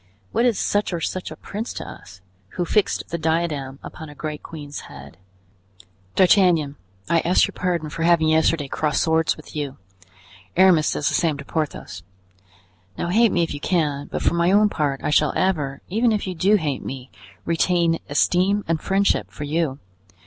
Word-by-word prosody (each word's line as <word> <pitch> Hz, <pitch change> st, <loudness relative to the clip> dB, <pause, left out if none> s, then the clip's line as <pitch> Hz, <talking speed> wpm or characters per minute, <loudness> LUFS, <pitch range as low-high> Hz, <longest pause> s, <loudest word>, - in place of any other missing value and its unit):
What 235 Hz, -, +2 dB
is 235 Hz, -, +1 dB
such 205 Hz, -2 st, 0 dB
or 170 Hz, -, -1 dB
such 185 Hz, +3 st, -3 dB
a -, -, -8 dB
prince 220 Hz, +4 st, -6 dB
to -, -, -6 dB
us, 95 Hz, -1 st, -12 dB, 0.4 s
who 175 Hz, -, 0 dB
fixed 205 Hz, +3 st, 0 dB
the 170 Hz, -, -3 dB
diadem 155 Hz, -5 st, -1 dB
upon 160 Hz, -1 st, -9 dB
a 145 Hz, -, -12 dB
great 150 Hz, 0 st, -5 dB
queen's 145 Hz, -3 st, -8 dB
head? 70 Hz, +3 st, -12 dB, 1.0 s
D'Artagnan, 180 Hz, -6 st, +4 dB, 0.3 s
I 170 Hz, 0 st, +3 dB
ask 175 Hz, +3 st, +3 dB
your -, -, -7 dB
pardon 175 Hz, -4 st, -1 dB
for 165 Hz, -, -6 dB
having 165 Hz, -1 st, +4 dB
yesterday 160 Hz, -2 st, +2 dB
crossed 150 Hz, +1 st, 0 dB
swords 160 Hz, 0 st, +2 dB
with 155 Hz, -, -13 dB
you; 145 Hz, -3 st, -4 dB, 0.8 s
Aramis 180 Hz, -5 st, +5 dB
does 145 Hz, -, -1 dB
the -, -, +1 dB
same 160 Hz, -4 st, +1 dB
to 140 Hz, -, -9 dB
Porthos; 140 Hz, -, -4 dB, 1.0 s
now 170 Hz, -, -2 dB
hate 225 Hz, +4 st, +4 dB
me 175 Hz, -, +2 dB
if 165 Hz, -, -3 dB
you 145 Hz, -, -5 dB
can; 145 Hz, -5 st, 0 dB
but -, -, -4 dB
for -, -, +2 dB
my 170 Hz, +1 st, +2 dB
own 210 Hz, +1 st, +5 dB
part, 145 Hz, -6 st, -1 dB
I -, -, 0 dB
shall 150 Hz, -1 st, +3 dB
ever, 150 Hz, -8 st, 0 dB
even 225 Hz, +5 st, +2 dB
if 210 Hz, -2 st, -1 dB
you 185 Hz, -, -3 dB
do 190 Hz, +5 st, +3 dB
hate 150 Hz, -8 st, -1 dB
me, 130 Hz, -1 st, -7 dB, 0.3 s
retain 170 Hz, 0 st, +2 dB
esteem 185 Hz, +7 st, +2 dB
and 160 Hz, -1 st, 0 dB
friendship 195 Hz, +1 st, +1 dB
for -, -, -8 dB
you. 150 Hz, -2 st, -1 dB
165 Hz, 185 wpm, -22 LUFS, 145-185 Hz, 1.0 s, Aramis